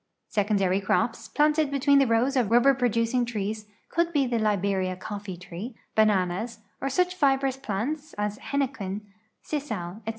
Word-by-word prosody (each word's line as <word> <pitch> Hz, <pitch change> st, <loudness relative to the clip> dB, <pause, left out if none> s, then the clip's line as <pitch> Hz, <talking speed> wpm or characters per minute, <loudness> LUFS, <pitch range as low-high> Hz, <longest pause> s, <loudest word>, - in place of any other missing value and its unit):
Secondary 200 Hz, -2 st, +1 dB
crops, 225 Hz, +4 st, 0 dB
planted 300 Hz, 0 st, +2 dB
between 280 Hz, 0 st, +4 dB
the 275 Hz, -, +4 dB
rows 235 Hz, +4 st, +2 dB
of 250 Hz, -5 st, +3 dB
rul)ber 240 Hz, +5 st, +5 dB
produc 230 Hz, -2 st, +1 dB
ing 250 Hz, -1 st, +3 dB
trees, 215 Hz, -2 st, -3 dB, 0.2 s
could 340 Hz, 0 st, +1 dB
be 290 Hz, -4 st, +2 dB
the 240 Hz, -2 st, 0 dB
Tjiberia 195 Hz, -3 st, 0 dB
colTee 200 Hz, -1 st, -6 dB
tree, 185 Hz, +7 st, -7 dB, 0.2 s
bananas, 215 Hz, +1 st, +1 dB, 0.2 s
or 275 Hz, -, 0 dB
such 360 Hz, +6 st, +1 dB
fibrous 270 Hz, -5 st, +2 dB
])lants 290 Hz, +10 st, -2 dB
as 210 Hz, 0 st, -2 dB
hennequen, 225 Hz, -8 st, -2 dB, 0.4 s
sisal, 215 Hz, -, -4 dB
etc. -, -, -14 dB
230 Hz, 155 wpm, -26 LUFS, 200-275 Hz, 0.4 s, rul)ber